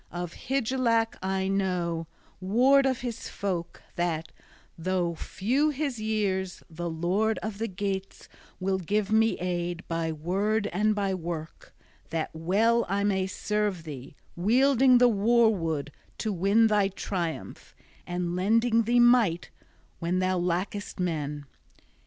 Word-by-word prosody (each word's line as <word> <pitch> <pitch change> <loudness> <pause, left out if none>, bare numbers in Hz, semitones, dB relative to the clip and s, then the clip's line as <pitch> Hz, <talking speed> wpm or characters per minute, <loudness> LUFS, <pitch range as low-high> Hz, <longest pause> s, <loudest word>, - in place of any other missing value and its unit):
Of 175 -1 -5 0.2
Hygelac 240 -3 +1
I 190 0 -1
know, 180 -4 -1 0.3
ward 255 +9 +4
of 260 -2 -1
his 240 -1 -5
folk, 180 -4 -4
that, 165 -2 -1 0.4
though 175 0 -1
few 250 - 0
his 280 -4 -2
years, 200 -4 -1
the 170 +1 -5
lord 185 +7 0
of 215 -2 -5
the 225 - -1
Geats 195 0 -4 0.3
will 190 0 0
give 205 +3 -1
me 225 +1 +3
aid 175 -1 -3
by 165 -1 -1
word 195 +7 0
and 210 +3 +2
by 200 -2 0
work, 165 -3 -6 0.4
that 165 -1 -2
well 210 +9 +2
I 200 +1 0
may 190 -2 +1
serve 205 -2 -2
thee, 140 -3 -9 0.2
wielding 255 +6 +4
the 245 0 +6
war 230 +1 +4
wood 160 -6 -2 0.3
to 215 -2 -2
win 200 +5 +3
thy 210 -2 +3
triumph 180 -4 -5 0.3
and 175 0 -2
lending 225 +4 +2
thee 240 +2 +3
might 240 -8 +4 0.5
when 170 +1 -1
thou 185 0 +1
lackest 180 +4 -2
men. 150 -5 -2
195 Hz, 135 wpm, -27 LUFS, 175-220 Hz, 0.5 s, the